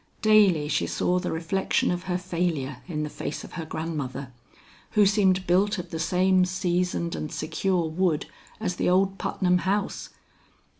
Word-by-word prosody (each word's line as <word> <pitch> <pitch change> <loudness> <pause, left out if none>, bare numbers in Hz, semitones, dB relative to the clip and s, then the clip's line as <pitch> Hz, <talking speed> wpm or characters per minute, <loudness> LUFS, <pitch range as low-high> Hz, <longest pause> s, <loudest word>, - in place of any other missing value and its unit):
Daily 200 -8 +5
she - - 0
saw 180 +1 +1
the 180 - -3
reflection 165 +4 0
of 175 0 -3
her 180 -1 0
failure 170 -6 -2
in 155 -4 -3
the - - -2
face 145 - -5
of - - -10
her 165 -3 -5
grandmother, 140 -5 -4 0.7
who 210 - +7
seemed 190 -2 +3
built 195 +4 +2
of 180 -1 -6
the 165 - -4
same 185 +3 +3
seasoned 180 -1 -1
and 155 - -4
secure 175 +1 -1
wood 160 -1 0 0.3
as 185 -5 -2
the - - +1
old 190 +1 +2
Putnam 180 -1 +1
house. 195 +3 -1
180 Hz, 160 wpm, -26 LUFS, 165-190 Hz, 0.7 s, who